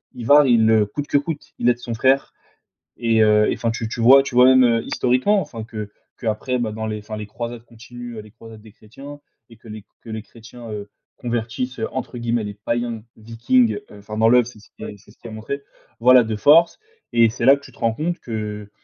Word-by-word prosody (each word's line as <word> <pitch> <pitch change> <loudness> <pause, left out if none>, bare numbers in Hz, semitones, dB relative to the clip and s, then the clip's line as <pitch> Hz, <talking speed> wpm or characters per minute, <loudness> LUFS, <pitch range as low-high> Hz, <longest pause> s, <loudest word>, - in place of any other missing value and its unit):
Ivar 145 +5 +5
il, 110 -2 +4
heu, 110 -2 +4
coûte 145 +7 -6
que - - +2
coûte, 145 +1 -5
il 120 - +2
aide 120 0 +1
son 120 -1 -6
frère, 130 +4 +1 0.6
et 115 -2 +1
heu, 105 0 +4
et - - -1
enfin 115 -1 -2
tu 115 -1 -4
tu 115 - -5
vois 135 +4 +7
tu 130 - -7
vois? 125 0 +7
Même, 130 0 +6
heu, 115 -2 +2
historiquement 130 +12 +1
enfin 115 -10 -8
que 110 -2 -7 0.3
que 115 - -7
après 125 +4 -1
bah 110 -3 -2
dans 110 +1 -5
les 105 0 -4
enfin 105 +1 -8
les 105 - -6
croisades 115 +1 -7
continuent, 120 0 -11
heu, - - -6
les 105 -1 -16
croisades 115 -1 -14
des 110 -1 -16
chrétiens 140 +8 -13 0.3
et 115 - -16
que 115 - -18
les 105 -1 -9 0.2
que 115 - -13
les 110 0 -5
chrétiens, 115 +1 -13
heu, 105 -1 -7 0.3
convertissent, 120 +1 -4
heu, 110 - -2
entre 130 -1 -5
guillemets 120 -1 -1
«les 105 - -6
païens 115 +2 -4
vikings,» 115 - +1 0.2
heu, 105 - -13
enfin 105 +1 -9
dans 110 +1 +4
l'oeuvre 125 -1 +5
c'est 115 -3 -13
ce - - -20
qui 105 - -8
c'est 105 - -23
ce - - -24
qui - - -12
est 115 - -9
montré. 115 +6 -6 0.4
Voilà 125 +1 +6
de 110 -1 -3
force 155 +10 +4 0.4
et 115 -1 +5
c'est 115 - -3
là 135 +1 +7
que 140 - -13
tu - - -14
te - - -22
rends 115 -1 +1
compte 170 +6 -3
que 105 -2 -6
115 Hz, 240 wpm, -21 LUFS, 110-125 Hz, 0.6 s, vois